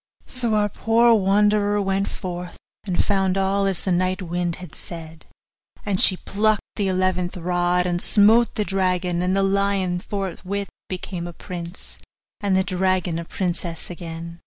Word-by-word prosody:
So 240 -4 -1
our 210 -1 +3
poor 230 +3 +3
wanderer 205 0 +3
went 195 0 0
forth, 180 -2 -6 0.3
and 180 - +1
found 195 -2 +1
all 195 +1 +1
as 190 -3 -1
the 190 - -1
night 185 +1 +1
wind 175 0 -2
had 180 -4 -11
said; 165 -2 -10 0.6
and 200 -3 +1
she 185 - +7
plucked 210 +2 +1
the 205 -2 0
eleventh 185 -1 0
rod, 175 0 +1
and 175 -1 -1
smote 225 +3 +5
the 210 -3 0
dragon, 180 -2 0
and 185 +2 +1
the 195 - +3
lion 195 -2 +1
forthwith 195 +1 -4 0.2
became 180 -1 -5
a 175 - -8
prince, 175 +1 -8 0.4
and 200 -2 +1
the 190 - +3
dragon 185 -2 0
a 170 - -6
princess 175 -2 -3
again. 170 -1 -7
185 Hz, 160 wpm, -23 LUFS, 175-200 Hz, 0.6 s, she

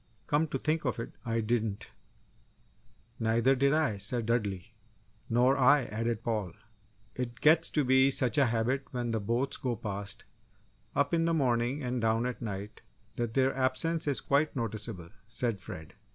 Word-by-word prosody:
"Come 150 +2 +1
to 135 - -2
think 155 +4 0
of 125 - -1
it, 115 - -5
I 115 -1 -1
didn't!" 110 -2 -2 1.3
"Neither 115 +4 +3
did 140 +1 +3
I," 150 -9 +1
said 115 +3 -1
Dudley. 105 -3 -1 0.6
"Nor 125 +3 +4
I," 140 +2 +6
added 115 0 -2
Paul. 105 -7 -2 0.6
"It 125 -1 -5
gets 160 +2 +5
to 150 - +1
be 130 +1 +5
such 130 -2 +2
a 135 - +5
habit 120 +4 0
when 120 -2 -3
the 110 - 0
boats 120 +6 -1
go 125 -2 -2
past 100 -1 -5 0.7
up 140 +2 +1
in 165 -1 +3
the 165 0 +2
morning 130 0 +1
and 125 -1 -2
down 115 +1 +1
at 125 0 -4
night 105 -1 -6 0.4
that 120 -2 -2
their 135 0 +3
absence 150 +6 0
is 140 - +1
quite 145 +2 +1
noticeable," 105 -7 -4 0.2
said 115 -3 -2
Fred. 80 -5 -9
120 Hz, 165 wpm, -30 LUFS, 110-135 Hz, 1.3 s, I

